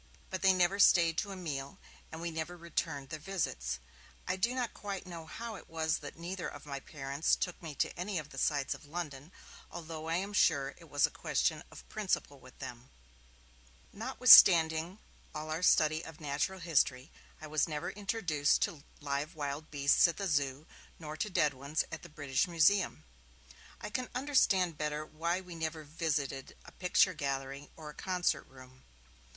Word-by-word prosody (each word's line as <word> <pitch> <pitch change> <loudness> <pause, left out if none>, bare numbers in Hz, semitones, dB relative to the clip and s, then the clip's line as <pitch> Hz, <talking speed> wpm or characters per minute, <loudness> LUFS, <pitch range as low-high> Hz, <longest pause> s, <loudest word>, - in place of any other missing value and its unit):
But 185 - -3
they 190 - +6
never 185 +2 +2
stayed 170 -4 +6
to 205 - -3
a - - -5
meal, 140 -6 -5 0.3
and 160 - -7
we 170 0 -3
never 160 +2 -4
returned 160 -4 -3
their 155 - -5
visits. 150 - -2 0.5
I - - +1
do 235 +7 0
not 245 -3 -2
quite 200 -2 -5
know 170 -3 -8
how 230 +6 -6
it - - -14
was 160 -1 0
that 145 +1 -9
neither 175 +2 -4
of - - -9
my 140 -2 -5
parents 140 +1 -1
took 180 - -4
me 160 -4 -7
to - - -1
any 185 +2 -3
of 155 -2 -5
the 135 - -6
sights 145 -1 +1
of 150 - -13
London, 150 -2 -6 0.4
although 160 -2 -7
I 165 - +1
am 195 +3 -2
sure 140 -8 +3
it 165 -2 -15
was 145 0 +4
a - - -3
question - - 0
of - - -13
principle 190 - -2
with 130 0 -16
them. 125 -2 -8 1.0
Notwithstanding 180 -8 +7 0.4
all 155 +1 -4
our 160 +2 -2
study 155 -2 +4
of 160 -1 -10
natural 150 +5 -2
history, 145 -4 +1 0.3
I 155 - -8
was 155 +1 +1
never 150 -1 -3
introduced 195 -8 +1
to 145 -4 -3 0.2
live 145 +2 -2
wild 145 +1 -4
beasts 140 +3 +4
at 170 - -3
the 200 - -2
Zoo, 145 -3 0 0.3
nor 155 -2 -7
to 210 - -1
dead 150 -6 +2
ones 140 +4 -1
at - - -6
the 170 - -11
British 145 -2 0
Museum. 180 +3 +3 0.8
I - - -6
can 255 +2 -3
understand 195 - +2
better 150 0 -2
why 170 +4 -2
we 180 -2 -10
never 160 -1 -4
visited 145 -3 -3
a - - -12
picture 185 +1 +3
gallery 140 -1 -4
or 155 -2 -9
a - - -16
concert 180 +1 -1
room. 130 0 -15
160 Hz, 180 wpm, -32 LUFS, 145-180 Hz, 1.0 s, Notwithstanding